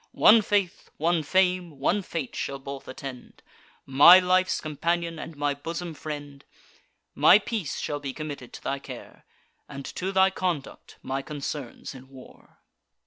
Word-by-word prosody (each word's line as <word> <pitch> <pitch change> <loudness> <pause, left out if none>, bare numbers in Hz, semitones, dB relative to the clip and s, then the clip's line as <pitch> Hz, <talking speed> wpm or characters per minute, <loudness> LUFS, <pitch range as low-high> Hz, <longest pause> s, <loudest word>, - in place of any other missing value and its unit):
One 225 +1 +7
faith, 200 -3 -1
one 165 +1 +1
fame, 180 -1 +1
one 180 +9 +1
fate, 165 -7 -5
shall 140 - -3
both 135 0 -8
attend; 130 -1 -9 0.4
My 145 +7 +9
life's 185 0 +2
companion, 165 +2 -2
and 160 -1 -8
my 145 0 0
bosom 165 +4 -6
friend: 145 -2 -8 0.7
My 190 - +7
peace 215 -7 -4
shall 145 -1 -3
be 140 -2 -5
committed 145 -4 -7
to - - -10
thy 140 - -2
care, - - -11 0.4
And 140 0 -8
to 190 +1 -4
thy 190 0 +4
conduct 175 -7 -4
my 135 +1 -3
concerns 145 -2 -6
in 130 0 -13
war." 130 -2 -16
155 Hz, 145 wpm, -26 LUFS, 140-180 Hz, 0.7 s, My